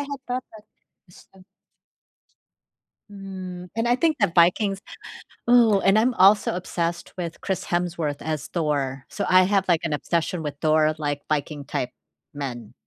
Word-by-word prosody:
had 280 Hz, 0 st, -5 dB
thought 250 Hz, +1 st, -2 dB
that 215 Hz, -, -14 dB, 0.5 s
Eston 185 Hz, +1 st, -19 dB, 1.7 s
Mm, 185 Hz, -2 st, -8 dB
and 225 Hz, +1 st, 0 dB
I 245 Hz, -, +3 dB
think 315 Hz, +2 st, +2 dB
that 195 Hz, -5 st, +2 dB
Vikings 195 Hz, +3 st, +3 dB, 0.7 s
Ooh, 230 Hz, -5 st, +6 dB
and 195 Hz, +2 st, +4 dB
I'm 245 Hz, +3 st, +2 dB
also 200 Hz, 0 st, +5 dB
obsessed 175 Hz, -1 st, -3 dB
with 170 Hz, -2 st, -5 dB
Chris 190 Hz, -2 st, -2 dB
Hemsworth 170 Hz, -4 st, -2 dB
as 155 Hz, -2 st, -3 dB
Thor. 140 Hz, -5 st, -2 dB
So -, -, -4 dB
I 185 Hz, 0 st, +6 dB
have, 195 Hz, 0 st, +1 dB
like, 170 Hz, -3 st, +3 dB
an 165 Hz, -, -2 dB
obsession 170 Hz, +3 st, -1 dB
with 145 Hz, -2 st, -5 dB
Thor, 155 Hz, 0 st, +3 dB
like, 145 Hz, -2 st, -2 dB
Viking-type 145 Hz, -4 st, -2 dB, 0.4 s
men. 120 Hz, -6 st, -6 dB
175 Hz, 145 wpm, -24 LUFS, 155-195 Hz, 1.7 s, Ooh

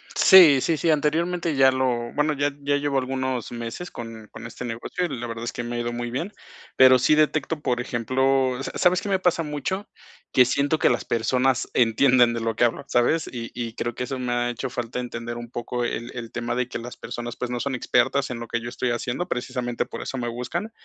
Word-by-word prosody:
Sí, 165 Hz, -9 st, +8 dB
sí, 165 Hz, +3 st, +1 dB
sí, 165 Hz, +2 st, +2 dB
anteriormente 165 Hz, +2 st, 0 dB
ya 135 Hz, -1 st, +6 dB
lo 125 Hz, -3 st, -1 dB
bueno, 150 Hz, +1 st, +1 dB
ya 145 Hz, 0 st, 0 dB
ya 145 Hz, 0 st, +1 dB
llevo 145 Hz, -1 st, 0 dB
algunos 130 Hz, -2 st, -3 dB
meses 120 Hz, +9 st, -6 dB
con 115 Hz, -2 st, -9 dB
con -, -, -11 dB
este 115 Hz, -, -8 dB
negocio 120 Hz, +9 st, -3 dB
y 175 Hz, -, -3 dB
la 120 Hz, -3 st, -5 dB
verdad 115 Hz, -1 st, -6 dB
es 120 Hz, -, -3 dB
que 120 Hz, -, -5 dB
me 120 Hz, 0 st, -4 dB
ha -, -, -2 dB
ido 120 Hz, 0 st, -2 dB
muy 120 Hz, 0 st, -4 dB
bien. 165 Hz, -, -3 dB, 0.4 s
Pero 130 Hz, -1 st, +7 dB
sí 150 Hz, +5 st, +4 dB
detecto, 155 Hz, 0 st, +1 dB
por 125 Hz, -4 st, 0 dB
ejemplo, 130 Hz, +2 st, +1 dB
¿sa -, -, -5 dB
sabes 180 Hz, +1 st, +3 dB
qué 205 Hz, -, -5 dB
me 190 Hz, -, +3 dB
pasa 180 Hz, -2 st, +2 dB
mucho?, 155 Hz, +7 st, -3 dB, 0.4 s
que 125 Hz, -1 st, +6 dB
siento 140 Hz, +4 st, +1 dB
que -, -, +4 dB
las 120 Hz, -, 0 dB
personas 125 Hz, +3 st, +1 dB
entienden 120 Hz, +1 st, +4 dB
de 115 Hz, -, -3 dB
lo 115 Hz, -1 st, -1 dB
que -, -, +1 dB
hablo, 120 Hz, -1 st, +1 dB
¿sabes?, 120 Hz, +7 st, +2 dB
y 115 Hz, -2 st, -6 dB
y 115 Hz, -2 st, -4 dB
creo 120 Hz, -1 st, -3 dB
que -, -, -3 dB
eso 130 Hz, +1 st, -4 dB
me 125 Hz, -1 st, -2 dB
ha 120 Hz, 0 st, 0 dB
hecho 120 Hz, -, -4 dB
falta 120 Hz, 0 st, -4 dB
entender 120 Hz, -1 st, -5 dB
un 120 Hz, 0 st, -8 dB
poco 120 Hz, +1 st, -3 dB
el 120 Hz, 0 st, -3 dB
el 115 Hz, -2 st, -6 dB
tema 120 Hz, 0 st, -3 dB
de 125 Hz, 0 st, 0 dB
que -, -, -5 dB
las 120 Hz, +1 st, -8 dB
personas, 120 Hz, 0 st, -6 dB
pues, 125 Hz, -, -4 dB
no 125 Hz, 0 st, -3 dB
son 140 Hz, +1 st, -2 dB
expertas 130 Hz, +2 st, +1 dB
en 120 Hz, -2 st, -5 dB
lo 115 Hz, -, -7 dB
que 115 Hz, -, -2 dB
yo 120 Hz, -, -5 dB
estoy 125 Hz, 0 st, -2 dB
haciendo. 120 Hz, +8 st, -2 dB
Precisamente, 125 Hz, -3 st, -2 dB
por -, -, -7 dB
eso 135 Hz, -, -5 dB
me 120 Hz, -, -2 dB
buscan. 125 Hz, -, -4 dB
125 Hz, 235 wpm, -24 LUFS, 120-145 Hz, 0.4 s, Sí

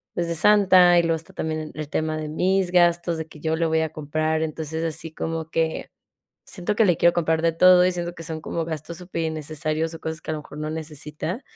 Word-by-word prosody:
pues, 170 Hz, -1 st, -1 dB
de 170 Hz, -, -1 dB
Santa. 185 Hz, -2 st, +6 dB
Y -, -, +2 dB
luego 165 Hz, -1 st, +1 dB
está 160 Hz, -, -14 dB
también 155 Hz, -1 st, -3 dB
el 155 Hz, -1 st, -5 dB
tema 155 Hz, 0 st, -1 dB
de 155 Hz, -1 st, -4 dB
mis 185 Hz, +3 st, +1 dB
gastos, 175 Hz, -1 st, +3 dB
de 160 Hz, -, -5 dB
que 155 Hz, -, -14 dB
yo 160 Hz, 0 st, 0 dB
le 165 Hz, +1 st, 0 dB
voy 160 Hz, 0 st, +2 dB
a 160 Hz, -1 st, -2 dB
comprar. 155 Hz, +1 st, -1 dB
Entonces, 160 Hz, 0 st, -4 dB
así 160 Hz, 0 st, -4 dB
como 160 Hz, 0 st, -4 dB
que 160 Hz, -1 st, -1 dB, 0.6 s
siento 185 Hz, +3 st, -3 dB
que 225 Hz, -, +4 dB
le 175 Hz, -4 st, +3 dB
quiero 170 Hz, -, +4 dB
comprar 160 Hz, -2 st, +1 dB
de 165 Hz, 0 st, +2 dB
todo 180 Hz, +2 st, +6 dB
y 185 Hz, -, +3 dB
siento 175 Hz, 0 st, -4 dB
que 165 Hz, -, -9 dB
son 160 Hz, -1 st, -6 dB
como 165 Hz, 0 st, -3 dB
gastos 160 Hz, +1 st, -6 dB
superinnecesarios 160 Hz, -2 st, -3 dB
o 165 Hz, -, -8 dB
cosas 160 Hz, 0 st, -4 dB
que -, -, -5 dB
a -, -, -1 dB
lo -, -, -5 dB
mejor 150 Hz, -, -12 dB
no 155 Hz, 0 st, -3 dB
necesita 155 Hz, -, -5 dB
160 Hz, 235 wpm, -24 LUFS, 155-175 Hz, 0.6 s, Santa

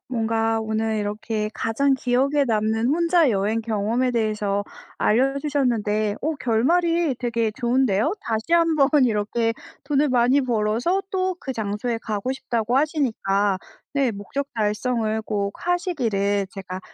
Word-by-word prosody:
뭔가 225 Hz, -2 st, 0 dB
오늘 220 Hz, 0 st, -1 dB
이렇게 210 Hz, +1 st, -2 dB
가장 270 Hz, +5 st, +1 dB
기억에 265 Hz, +3 st, +1 dB
남는 220 Hz, +1 st, +1 dB
혼자 335 Hz, 0 st, +3 dB
여행 210 Hz, +2 st, 0 dB
경험에 225 Hz, +3 st, 0 dB
대해서 210 Hz, -3 st, 0 dB, 0.4 s
알려주셨는데 245 Hz, -5 st, +1 dB
어 315 Hz, +1 st, -1 dB
결말이 330 Hz, +7 st, +2 dB
되게 230 Hz, -2 st, 0 dB
좋은데요. 245 Hz, -, +1 dB
다시 225 Hz, +8 st, -3 dB
한번 325 Hz, -5 st, +4 dB, 0.2 s
이렇게 225 Hz, +1 st, 0 dB, 0.3 s
돈을 290 Hz, 0 st, +2 dB
많이 250 Hz, +2 st, +3 dB
벌어서 240 Hz, -, 0 dB
또 375 Hz, -1 st, 0 dB
그 265 Hz, -, -4 dB
장소에 220 Hz, +1 st, -2 dB
가고 215 Hz, +4 st, -2 dB
싶다고 240 Hz, -2 st, -1 dB
하시니까 220 Hz, -, +1 dB, 0.3 s
네 275 Hz, -4 st, +2 dB
목적 205 Hz, +8 st, -4 dB
달성을 220 Hz, 0 st, 0 dB
꼭 200 Hz, -2 st, -2 dB
하시기를 225 Hz, -, 0 dB
제가 185 Hz, -2 st, -7 dB
230 Hz, 285 characters per minute, -23 LUFS, 215-275 Hz, 0.4 s, 한번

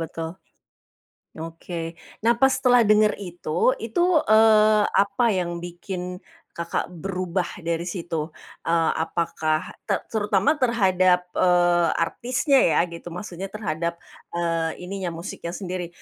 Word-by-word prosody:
betul, 165 Hz, 0 st, -4 dB, 1.1 s
oke. 165 Hz, 0 st, -6 dB, 0.3 s
Nah, 235 Hz, -, +6 dB
pas 265 Hz, 0 st, +5 dB
setelah 245 Hz, -2 st, +4 dB
denger 215 Hz, 0 st, +4 dB
itu, 175 Hz, +3 st, 0 dB
itu, 225 Hz, +8 st, -2 dB, 0.3 s
eee 215 Hz, -1 st, +6 dB, 0.2 s
apa 200 Hz, +4 st, +1 dB
yang 180 Hz, -2 st, -1 dB
bikin 180 Hz, +1 st, -6 dB, 0.4 s
Kakak 170 Hz, 0 st, -2 dB
berubah 180 Hz, 0 st, -3 dB
dari 170 Hz, 0 st, -1 dB
situ? 165 Hz, -3 st, -4 dB, 0.3 s
E 165 Hz, -, 0 dB, 0.3 s
apakah 160 Hz, -1 st, -1 dB, 0.2 s
te -, -, +3 dB, 0.2 s
terutama 210 Hz, +6 st, +2 dB
terhadap, 185 Hz, -7 st, +3 dB
eee 175 Hz, -1 st, +4 dB, 0.2 s
artisnya 255 Hz, -, 0 dB, 0.2 s
ya -, -, +3 dB
gitu, 170 Hz, +1 st, -8 dB
maksudnya 185 Hz, +1 st, -6 dB
terhadap 170 Hz, -5 st, -3 dB, 0.4 s
e 170 Hz, -, -2 dB, 0.4 s
ininya 185 Hz, 0 st, -4 dB
musiknya 170 Hz, 0 st, -6 dB
sendiri. 180 Hz, -3 st, -4 dB
180 Hz, 115 wpm, -24 LUFS, 170-210 Hz, 1.1 s, Nah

